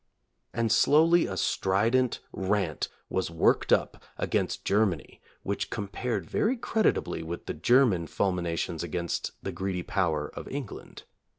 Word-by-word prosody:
And 115 -2 0
slowly 160 +8 +5
a 95 - -4
strident 115 +9 +1
rant 95 -5 -1 0.2
was 95 - -1
worked 85 -1 +2
up - - +2 0.2
against - - -1
Germany 100 -5 0 0.2
which - - -2
compared 100 -2 -3
very 240 - +1
creditably 220 - 0
with 85 +1 -6
the - - -3
German 120 -10 +3
fulminations 85 -3 -1
against 85 +1 -3
the - - -3
greedy 95 -2 -3
power 80 -7 0
of - - -7
England. 135 -5 -7
95 Hz, 125 wpm, -28 LUFS, 85-120 Hz, 0.2 s, slowly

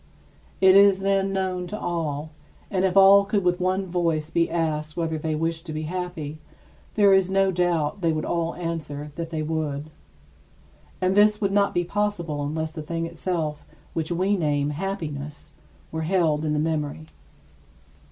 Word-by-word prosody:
It 190 0 +7
is, 200 -1 +6
then, 195 0 +1
known 185 -2 -2
to 210 +3 -5
all; 155 -3 -3 0.4
and 190 -1 +1
if 190 0 +1
all 195 +1 +8
could 200 0 0
with 180 0 +1
one 185 +1 0
voice 165 -3 -1
be 170 0 +2
asked 155 -2 -2
whether 160 -2 -1
they 155 0 -2
wished 165 +2 -2
to 155 - -5
be 155 +1 -3
happy, 160 -3 -5 0.6
there 200 -2 +5
is 190 -1 +4
no 195 0 +3
doubt 175 -1 0
they 165 -2 +2
would 155 -1 -2
all 170 -1 -1
answer 155 -4 -5
that 165 +1 -5
they 160 -2 -3
would. 155 -1 -3 1.1
And 185 0 +2
this 210 +1 +4
would 200 -2 0
not 200 0 +2
be 175 - +2
possible 175 -6 -2
unless 160 +2 -3
the 160 -1 -6
thing 165 +2 -3
itself, 165 -2 -3 0.3
which 160 0 -3
we 185 +4 +1
name 145 -4 0
"happiness," 150 -4 -5 0.4
were 160 - -3
held 160 -3 +1
in 150 - 0
the - - 0
memory. 150 - -2
170 Hz, 170 wpm, -24 LUFS, 155-190 Hz, 1.1 s, all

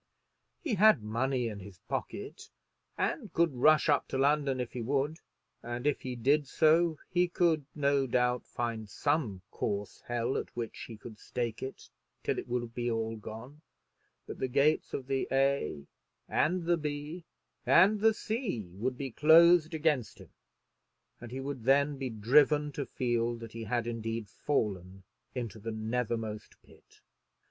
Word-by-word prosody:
He 300 -9 -1
had 210 - +5
money 125 +3 0
in 105 -2 -6
his 95 -1 -11
pocket, - - -5 0.5
and - - -2
could 170 -3 +2
rush 155 +6 +4
up 145 -2 +2
to - - -3
London 140 -1 +2
if 125 - -4
he 125 - -4
would, 140 +6 -1 0.4
and 120 +2 -5
if 145 -1 +1
he 130 -1 -4
did 140 +5 +2
so 160 +2 +3
he 180 0 +3
could, 170 -4 +1
no 140 -2 +2
doubt, 125 0 +1
find 115 -3 -4
some 125 - -1
coarse 100 0 -3
hell 120 +1 -1
at - - -8
which 115 -2 -5
he 115 - -9
could 110 0 -11
stake 120 -3 -4
it 130 - -7 0.4
till - - 0
it - - -7
would 120 -1 -3
be 120 0 -2
all 115 -1 -1
gone; 115 +7 -9 0.6
but - - -8
the 130 - 0
gates 140 +4 +2
of 130 - -5
the 135 0 -1
A 135 - +1 0.4
and 175 +3 +1
the 170 +1 +2
B 150 +2 -5 0.4
and 200 +4 +5
the 220 +1 +4
C 215 - -3
would 125 +6 -2
be 135 -2 -4
closed 165 +3 +6
against 150 -7 0
him; - - -15 0.9
and 120 - -9
he 130 +3 -5
would 135 -3 -5
then 140 +1 +3
be 135 -2 -2
driven 145 +7 +3
to 140 -1 -4
feel 120 -1 0
that 115 -1 -9
he 115 0 -6
had 120 +2 -1
indeed 115 -1 -3
fallen 95 -5 -2 0.3
into 115 -3 -4
the 115 +2 -5
nethermost 110 -1 -3
pit. - - -22
130 Hz, 160 wpm, -31 LUFS, 115-150 Hz, 0.9 s, closed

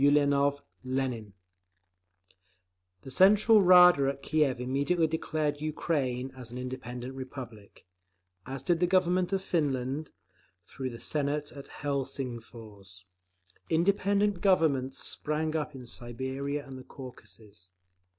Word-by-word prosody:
ULIANOV 145 0 +3 0.2
(LENIN) 130 -5 -3 1.7
The 135 - -9
Central 210 - +6
Rada 180 -6 +7
at 140 0 -6
Kiev 150 -5 +1
immediately 140 +7 +1
declared 155 -2 -2
Ukraine 135 -5 -2
an 125 -2 -9
independent 125 0 -6
Republic, 125 -6 -9 0.6
as 135 0 -6
did 170 +3 +1
the 180 - +3
Government 185 0 +2
of 190 -1 0
Finland, 145 -4 -1 0.5
through 130 +8 -6
the 115 -2 -9
Senate 145 +3 -1
at 140 -1 -10
Helsingfors. 115 -8 -6 0.7
Independent 200 +3 +2
"Governments" 150 -9 +2
spring 155 +1 -1
up 150 -2 -2
in 130 -2 -9
Siberia 130 +4 -3
and 135 -1 -9
the - - -10
Caucasus. 110 -8 -12
140 Hz, 110 wpm, -29 LUFS, 125-160 Hz, 1.7 s, Rada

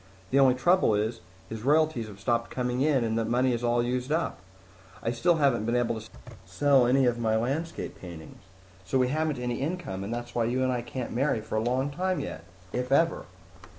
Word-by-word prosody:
The 135 - +4
only 130 -2 +5
trouble 175 - +3
is, 110 +2 -1 0.3
his 110 -1 -6
royalties 150 -3 +2
have 100 -2 -11
stopped 115 +3 0
coming 125 0 -2
in 140 -4 +3
and 110 -1 -1
that 115 - -1
money 125 +1 +2
is 120 0 -3
all 120 0 +2
used 125 +3 -2
up. 165 -7 -1 0.6
I 115 - 0
still 170 +9 +2
haven't 135 -8 +2
been 115 +1 0
able 120 -2 0
to 110 - -13 0.3
sell 140 -4 +3
any 130 +1 +4
of 120 -1 +1
my 110 -1 +1
landscape 140 +9 -3
paintings. 85 -1 -10 0.4
So 130 - 0
we 125 -1 +2
haven't 155 0 0
any 125 0 -3
income, 145 - -3
and 100 - -5
that's 120 0 -5
why 120 -1 +1
you 125 +3 0
and 130 - +1
I 125 -1 -1
can't 125 +1 -5
marry 135 -1 +1
for 110 - -9
a 110 - +1
long 130 +4 0
time 185 +5 -1
yet 80 - -6 0.3
if 125 +1 -2
ever!" 165 +4 +2
125 Hz, 215 wpm, -28 LUFS, 115-140 Hz, 0.6 s, only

